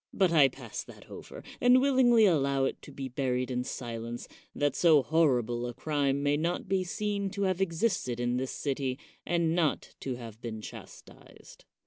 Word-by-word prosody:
But 190 -4 +2
I 150 -5 +6
pass 125 -4 -7
that - - -15
over, - - -10 0.2
and 250 +1 +6
willingly 255 -4 +5
allow 140 -7 +2
it - - -3
to - - -12
be 135 -1 -5
buried 130 0 -1
in 125 0 -1
silence, 120 -2 -6 0.3
that 145 -1 0
so 155 -5 +5
horrible 125 -7 +1
a 120 - -6
crime 140 -1 0
may 145 0 +2
not 170 +5 -2
be 190 0 +1
seen 200 +2 -2
to 200 +1 -3
have 190 -1 0
existed 170 - 0
in 120 0 0
this 130 +1 -2
city, 135 -2 -2 0.3
and 170 -1 +1
not 165 -4 0
to 130 -2 -4
have 115 -2 -10
been 110 -2 -5
chastised. 110 - -13
140 Hz, 175 wpm, -29 LUFS, 125-180 Hz, 0.3 s, I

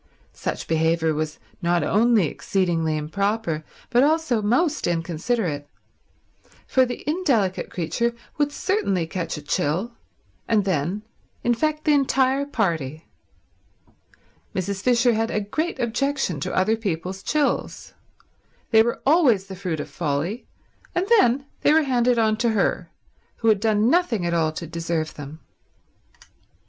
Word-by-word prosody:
Such - - -4
behaviour 160 0 +2
was 155 0 -3 0.2
not 175 0 +2
only 220 -2 +3
exceedingly 165 -1 0
improper 195 +1 -1 0.3
but 245 0 +5
also 300 -5 +2
most 265 - +1
inconsiderate, 165 -1 -2 1.0
for 260 -1 +3
the 245 +3 -7
indelicate 270 - +1
creature 235 +8 -1 0.2
would 290 0 +2
certainly 245 - 0
catch 165 -1 -4
a 150 - -8
chill, 170 +11 -1 0.5
and 210 -3 +2
then 185 +3 -1 0.4
infect 305 +6 0
the 305 - +4
entire 270 0 +2
party. 165 - -2 1.5
Mrs. 190 +1 -2
Fisher 240 +1 +3
had 225 +1 0
a - - 0
great 310 +12 -2
objection 240 - -1
to - - -3
other 210 +4 +2
people's 190 -3 -4
chills. 295 +6 -1 0.8
They 220 - +7
were 235 +1 -1
always 270 - +4
the 195 -1 -8
fruit 180 -4 -3
of - - -4
folly; 165 - -3 0.5
and 355 - +1
then 265 -2 +3 0.2
they 295 - +4
were 320 0 +5
handed 250 -3 +2
on 220 -1 +2
to 235 +1 +1
her, - - 0 0.5
who 225 - +1
had 215 -2 +4
done 215 0 +2
nothing 290 - +2
at 170 - 0
all 160 -2 +2
to 170 - -5
deserve 165 -1 -3
them. 145 +2 -9
210 Hz, 135 wpm, -23 LUFS, 165-245 Hz, 1.5 s, They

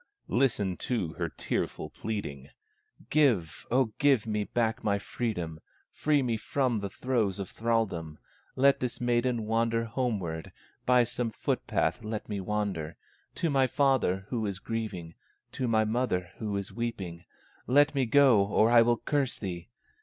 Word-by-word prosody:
Listen 105 -8 +2
to 100 -11 -2
her - - -3
tearful - - -3
pleading: 75 -11 -5 0.6
"Give, 120 - +2
O 125 -2 +2
give 140 -6 +4
me 105 -2 -1
back 115 0 -1
my 100 -1 +2
freedom, 90 -7 -3 0.3
Free 145 -2 +2
me 120 -3 0
from 120 +1 0
the 100 -1 -4
throes 110 -4 0
of 100 -3 -5
thralldom, 100 -9 -1 0.4
Let 140 +1 +4
this 125 -2 -3
maiden 120 -1 +1
wander 115 +1 +1
homeward, 105 -10 -2 0.4
By 125 -1 +6
some 120 0 -2
foot - - -2
path 120 - 0
let 110 0 -4
me 100 -2 -3
wander 95 -6 -2 0.4
To 165 - 0
my 135 -2 +4
father 130 -9 +2
who 115 -4 -1
is 100 -2 -3
grieving, 100 -6 -4 0.4
To 125 - -2
my 110 -1 +3
mother 110 -6 -1
who 105 -3 -2
is 100 -1 -5
weeping; 95 -8 -4 0.4
Let 145 +3 +5
me 135 -3 +1
go 130 -5 +6
or 105 +3 +3
I 120 -1 +8
will 120 +1 +3
curse 140 +1 -1
thee! 90 0 -6
115 Hz, 155 wpm, -29 LUFS, 100-125 Hz, 0.6 s, I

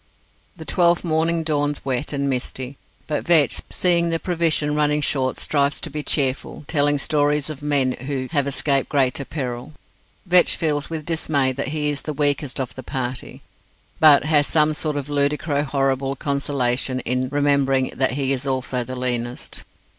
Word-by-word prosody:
The - - -9
twelfth 175 -1 +2
morning 165 0 +1
dawns 145 -2 -1
wet 130 +1 -1
and 140 -1 -1
misty, 130 0 -3 0.3
but 150 - -2
Vetch, 165 -5 +4
seeing 170 -2 +2
the 165 - +1
provision 165 -4 0
running 150 0 +1
short, 130 -3 0
strives 140 -1 0
to 160 - -4
be 150 +1 -3
cheerful, 140 -1 0
telling 145 -1 +2
stories 145 +1 0
of 150 - -9
men 140 -3 +1
who 130 +1 -4
have 145 -4 +1
escaped 140 -1 +1
greater 140 -1 +1
peril. 130 -1 -5 0.5
Vetch 180 -1 +4
feels 150 -2 -1
with 160 -2 -5
dismay 155 -5 +1
that 135 +2 -4
he 150 0 0
is 145 - -4
the 155 - -5
weakest 145 -1 -1
of 130 -2 -3
the 130 - -8
party, 130 -1 -4 0.6
but 150 -3 +7
has 150 -1 +3
some 155 -1 +3
sort 150 -1 -2
of 140 -1 -4
ludicro 145 0 0
horrible 135 -1 0
consolation 135 -2 -1
in 125 +1 -1
remembering 140 -2 +1
that 130 -1 +1
he 135 0 0
is 135 +1 -3
also 130 -1 -1
the 130 +2 -7
leanest. 120 -1 -3
145 Hz, 165 wpm, -22 LUFS, 130-150 Hz, 0.6 s, but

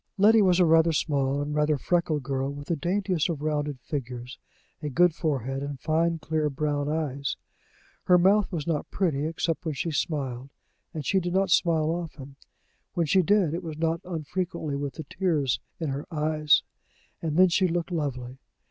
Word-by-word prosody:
Letty 215 +3 +6
was 185 -2 +4
a 180 - +6
rather 165 0 +4
small 140 -3 0
and 150 +1 -4
rather 150 0 +2
freckled 160 -2 0
girl, 135 +1 -2
with 145 0 -9
the 170 - +2
daintiest 180 +1 0
of 155 -3 -3
rounded 150 -3 -1
figures, 125 -3 -6 0.4
a 150 - -3
good 175 +4 +4
forehead, 135 -5 -2
and 140 -1 -5
fine 165 +2 +1
clear 155 -1 -1
brown 145 0 -1
eyes. 140 -3 -2 0.7
Her 180 - +6
mouth 195 +3 +4
was 160 -5 -3
not 160 -3 -2
pretty, 155 -6 0
except 165 +1 -2
when 160 -3 -3
she 165 +5 -2
smiled 135 -4 -2 0.4
and 155 -3 -6
she 190 - +2
did 175 0 -3
not 190 -1 +2
smile 160 -2 +3
often. 160 -5 -6 0.6
When 170 - +2
she 185 +5 +4
did, 185 -2 +2
it 170 - -2
was 160 -4 -6
not 165 +1 0
unfrequently 170 -2 -3
with 140 -1 -4
the 160 - -6
tears 155 -6 0 0.2
in 160 -3 -2
her 140 +2 -4
eyes, 155 -1 +2 0.6
and 160 -1 -2
then 185 0 +7
she 185 +2 +3
looked 175 +1 -2
lovely. 135 -6 -3
155 Hz, 180 wpm, -27 LUFS, 145-175 Hz, 0.7 s, then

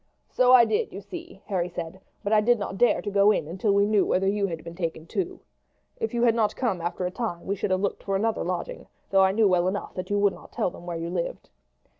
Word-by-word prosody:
"So 250 0 +3
I 250 -2 +8
did, 435 - 0
you - - -7
see," 350 -1 -10
Harry 180 -4 -1
said; 175 +1 -7 0.2
"but 205 +1 0
I 215 - +5
did 240 +3 +3
not 200 -2 -4
dare 245 - +3
to 205 - -3
go 200 +1 +5
in 185 -8 +1
until 190 +5 0
we 200 0 +4
knew 210 -1 +3
whether 190 +1 +1
you 200 0 +1
had 165 -3 -6
been 170 - -8
taken 165 -2 -4
too. 370 - -3 0.6
If 450 - -2
you 235 0 0
had 235 -2 +5
not 220 -2 +1
come 210 -9 -1
after 175 +2 -3
a 180 - -2
time 185 -5 -4
we 200 - -1
should 200 - -2
have 185 0 +1
looked 200 - -2
for 195 - -2
another 220 +3 0
lodging, 180 -1 -4 0.2
though 195 0 +5
I 190 - +4
knew 215 +1 +3
well 180 -1 +2
enough 200 +2 -3
that 185 - -6
you 205 - +1
would 200 -1 +3
not - - -14
tell - - 0
them 175 - -12
where 170 -1 -3
you 165 +1 -4
lived." 175 -2 -4
200 Hz, 265 wpm, -26 LUFS, 180-225 Hz, 0.6 s, I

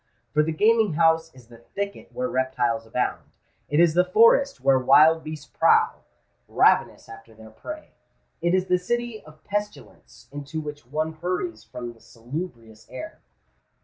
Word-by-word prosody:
For 150 - +4
the 155 +1 -1
gaming 215 +3 +3
house 165 0 +2
is 125 -2 -16
the 115 0 -16
thicket 200 +11 -6
where 255 0 -3
reptiles 125 - -1
abound—it 125 +5 -4
is 170 -2 +5
the 180 +2 +4
forest 230 +9 +4
where 135 -1 +3
wild 155 +5 +5
beasts 155 -1 -7
prowl, - - +2 0.4
ravenous - - +2
after 115 0 -14
their 110 0 -14
prey—it 185 - -6
is 185 0 +1
the 180 -1 +1
city 240 +3 -3
of 155 0 -17
pestilence 205 0 -6
into 145 +2 -6
which 150 -4 -8
one 155 +4 -2
hurries 180 - -4
from 120 -2 -8
the 115 - -23
salubrious 115 -3 -9
air. 130 0 -9
155 Hz, 145 wpm, -24 LUFS, 125-185 Hz, 0.4 s, is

